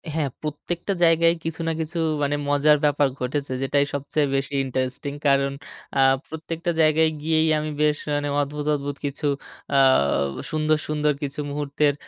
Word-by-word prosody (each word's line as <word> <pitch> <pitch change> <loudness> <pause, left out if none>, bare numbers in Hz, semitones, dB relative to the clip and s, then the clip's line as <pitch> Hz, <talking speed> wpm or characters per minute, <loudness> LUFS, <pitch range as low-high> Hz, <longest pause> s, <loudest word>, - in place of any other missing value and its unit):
হ্যাঁ 150 -4 0
প্রত্যেকটা 170 +5 -3
জায়গায়ই 165 0 +4
কিছু 165 +1 -3
না - - +2
কিছু 160 +2 -4 0.3
মানে 145 +1 +1
মজার 145 +1 +4
ব্যাপার 145 -1 +3
ঘটেছে 130 +1 -2
যেটাই 140 +1 +2
সবচেয়ে 145 +1 0
বেশি 135 +1 -2
ইন্টারেস্টিং। 130 +2 -3
কারণ 140 0 +3 0.5
আ - - +3 0.3
প্রত্যেকটা 165 +2 -4
জায়গায় 155 +1 +4
গিয়েই 160 +1 +2
আমি 155 0 -3
বেশ 150 -1 +3 0.2
মানে 145 0 -1
অদ্ভুত, 145 +1 -4
অদ্ভুত 145 0 -4
কিছু 145 +1 -2 0.5
আ - - +6 0.7
সুন্দর, 155 0 +2
সুন্দর 150 0 +1
কিছু 140 +1 -4
মুহূর্তের 145 0 +1
150 Hz, 150 wpm, -23 LUFS, 140-155 Hz, 0.7 s, আ